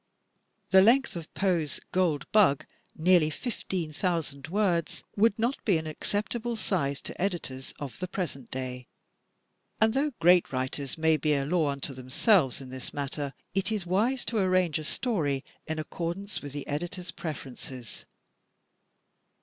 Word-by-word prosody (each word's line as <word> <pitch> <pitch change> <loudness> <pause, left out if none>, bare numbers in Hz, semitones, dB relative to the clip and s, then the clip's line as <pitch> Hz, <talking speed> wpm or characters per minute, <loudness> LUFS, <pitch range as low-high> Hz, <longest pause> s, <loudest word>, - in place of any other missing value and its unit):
The 190 0 +9
length 245 +5 +4
of 165 -2 -7
Poe's 170 -7 +1
"Gold 175 -6 +2
Bug," 195 -10 +5 0.3
nearly 170 -1 +5
fifteen 180 -5 -3
thousand 155 -5 -1
words, 180 -3 0
would 210 0 +4
not 235 +4 0
be 195 -6 +4
an 160 - -4
acceptable 220 +9 -2
size 140 -10 0
to - - -6
editors 165 -9 -2
of 140 -4 -6
the 185 - -2
present 170 -9 -4
day. 125 -1 -5 0.9
And 220 0 +4
though 285 +2 +1
great 175 0 +5
writers 130 +2 -2
may 160 0 +4
be 150 +1 +2
a 140 -1 0
law 160 -1 +2
unto 140 0 -3
themselves 130 - +2
in 130 -1 -9
this 130 -1 -7
matter, 140 0 -3 0.2
it 195 +2 0
is 210 -4 -1
wise 220 +9 +1
to 225 - 0
arrange 185 -4 +3
a - - -5
story 150 - 0 0.2
in 160 - -2
accordance 170 +5 -4
with 145 - -7
the 145 -1 -5
editors' 175 +5 -4
preferences. 130 -6 -7
165 Hz, 150 wpm, -29 LUFS, 140-195 Hz, 0.9 s, The